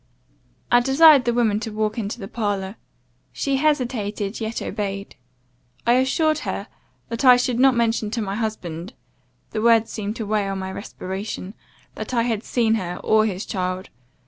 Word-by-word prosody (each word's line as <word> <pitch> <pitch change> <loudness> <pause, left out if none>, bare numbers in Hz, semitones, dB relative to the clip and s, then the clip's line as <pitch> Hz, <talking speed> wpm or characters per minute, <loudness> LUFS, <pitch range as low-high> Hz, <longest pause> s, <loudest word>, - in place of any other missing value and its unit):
I 245 - +7
desired 270 +2 +6
the 240 - +2
woman 220 -4 +2
to 225 - -4
walk 215 +1 -1
into 215 +2 -4
the 195 - -6
parlour. 205 -3 -2 0.6
She 275 -1 -1
hesitated, 240 -8 -1
yet 220 +1 -2
obeyed. 200 -1 -4 0.7
I 235 - +5
assured 310 +5 +2
her - - -4 0.4
that 230 +3 -3
I 250 -2 +8
should 245 -1 0
not 265 -1 +5
mention 230 -2 +1
to 230 +1 -2
my 195 -1 -3
husband 200 -3 -4 0.6
(the 215 - -2
word 230 -1 +5
seemed 210 0 -4
to 225 - -4
weigh 205 -1 0
on 195 - -3
my 190 0 -4
respiration), 190 0 -6 0.4
that 255 - -5
I 230 - +3
had 225 -2 -1
seen 230 -3 +1
her, 175 -1 -4
or 220 0 +4
his 190 -1 -4
child. 185 -1 -3
220 Hz, 170 wpm, -22 LUFS, 200-245 Hz, 0.7 s, I